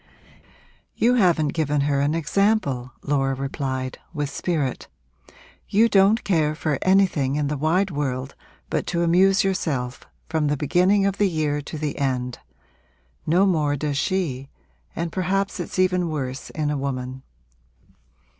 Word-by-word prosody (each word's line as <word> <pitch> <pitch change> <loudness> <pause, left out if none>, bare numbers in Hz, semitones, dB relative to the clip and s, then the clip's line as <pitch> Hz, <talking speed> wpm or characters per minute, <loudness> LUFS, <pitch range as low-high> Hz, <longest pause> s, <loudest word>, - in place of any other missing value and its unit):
'You 240 +2 +3
haven't 175 -10 +3
given 150 -1 0
her 140 -1 +1
an 145 +3 +1
example!' 165 - 0
Laura 135 -2 0
replied, 130 -1 -4 0.2
with 145 -2 -2
spirit. 150 -5 -2 0.8
'You 220 +3 +4
don't 205 +1 +4
care 155 -5 +1
for 155 -2 -1
anything 185 -8 +2
in 145 -1 0
the 150 - -1
wide 175 +7 +1
world 135 -3 -3 0.4
but - - -1
to 170 -1 0
amuse 190 +4 +4
yourself, 140 -10 -2 0.3
from 160 -2 0
the 145 0 0
beginning 180 +8 +3
of 200 0 -1
the 205 -2 +3
year 150 -3 -1
to 150 +2 -7
the 150 -1 -3
end. 125 -3 -1 0.9
No 180 +5 +4
more 155 -6 +1
does 145 0 -2
she 145 -9 -2 0.5
and 170 0 -3
perhaps 195 +2 -1
it's 175 - -5
even 180 -2 +2
worse 135 -4 -4
in 150 -1 -2
a 150 - -1
woman. 130 -1 -4
155 Hz, 145 wpm, -23 LUFS, 140-185 Hz, 0.9 s, You